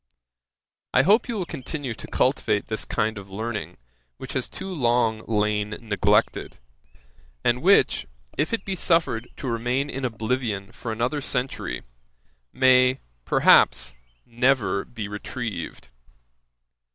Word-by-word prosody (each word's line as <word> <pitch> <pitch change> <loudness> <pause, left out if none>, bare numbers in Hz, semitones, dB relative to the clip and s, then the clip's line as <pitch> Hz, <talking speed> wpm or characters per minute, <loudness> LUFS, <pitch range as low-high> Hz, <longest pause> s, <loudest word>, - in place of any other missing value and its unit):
I 130 - +6
hope 210 - +4
you 235 - -1
will 190 -4 -2
continue 135 -3 -5
to - - -10
cultivate 125 -5 +1
this 110 - -2
kind 110 -1 -1
of 100 0 -12
learning, 110 +2 -4 0.4
which - - -7
has - - -2
too 190 - -6
long 120 -6 +2
lain 105 -1 0
neglected, 105 -1 +1 0.9
and 120 +1 +2
which, 180 - +4 0.3
if 150 - 0
it 230 - -2
be 195 - -2
suffered 165 -10 +1
to 135 - -5
remain 125 +4 -1
in 135 +1 -5
oblivion 110 -3 -2
for 115 - -6
another 120 +6 -1
century, 125 - -2 0.7
may, 130 0 +4 0.3
perhaps, 60 -1 +5 0.3
never 115 -6 +1
be 110 -4 -6
retrieved. 105 - -6
120 Hz, 125 wpm, -25 LUFS, 105-130 Hz, 0.9 s, I